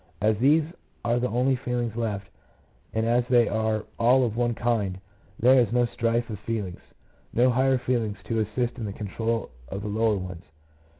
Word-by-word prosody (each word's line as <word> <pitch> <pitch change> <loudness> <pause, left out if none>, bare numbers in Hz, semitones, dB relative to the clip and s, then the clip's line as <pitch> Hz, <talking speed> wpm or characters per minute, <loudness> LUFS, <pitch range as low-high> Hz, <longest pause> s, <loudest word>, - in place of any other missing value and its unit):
As 105 +3 +3
these 150 +6 +5 0.4
are 120 +1 +2
the 125 - 0
only 125 +4 +2
feelings 120 -2 -2
left, 105 -4 -2 0.6
and 110 0 0
as 120 +1 +3
they 120 -2 +4
are 110 0 0
all 125 +3 +5
of 110 -2 -3
one 120 0 0
kind, 105 -6 0 0.4
there 130 +3 +6
is 120 -4 +2
no 120 0 +3
strife 115 0 0
of 105 - -5
feelings; 105 -4 -4 0.5
no 125 +2 +4
higher 130 +2 +3
feelings 120 -4 -1
to 115 -1 -1
assist 120 +4 -1
in 115 - -3
the 100 - -4
control 115 +3 -3 0.2
of 100 +6 -5
the - - -4
lower 110 0 +1
ones. 90 -2 -7
115 Hz, 180 wpm, -26 LUFS, 105-120 Hz, 0.6 s, there